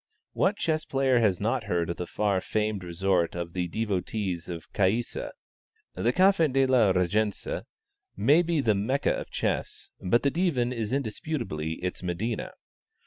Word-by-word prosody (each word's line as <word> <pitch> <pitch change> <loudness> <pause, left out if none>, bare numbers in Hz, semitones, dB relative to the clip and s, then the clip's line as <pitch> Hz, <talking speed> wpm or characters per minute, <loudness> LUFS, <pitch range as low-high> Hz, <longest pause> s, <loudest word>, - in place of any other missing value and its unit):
What 200 +2 +2
chess 155 -1 0
player 135 -2 +2
has 100 -6 +2
not 115 +3 0
heard 85 -4 0
of - - -6
the 90 - -4
far 100 -3 0
famed 105 -2 -1
resort 90 -1 0
of 85 -1 -4
the 90 -1 -1
devotees 95 -2 -2
of 85 -2 -7
Caïssa? 105 +5 0 0.6
The 120 - +1
Café 185 -2 +4
de 135 +1 +3
la 125 -6 +4
Régence 95 +3 0 0.6
may 140 - +5
be 170 -3 +1
the 110 -4 +3
Mecca 120 +8 +1
of - - -5
chess, - - -3
but 115 +6 +2
the 140 - +3
Divan 135 -9 +1
is 110 -3 -3
indisputably 120 - -2
its 90 - -3
Medina. 95 +6 -2
110 Hz, 155 wpm, -27 LUFS, 90-130 Hz, 0.6 s, may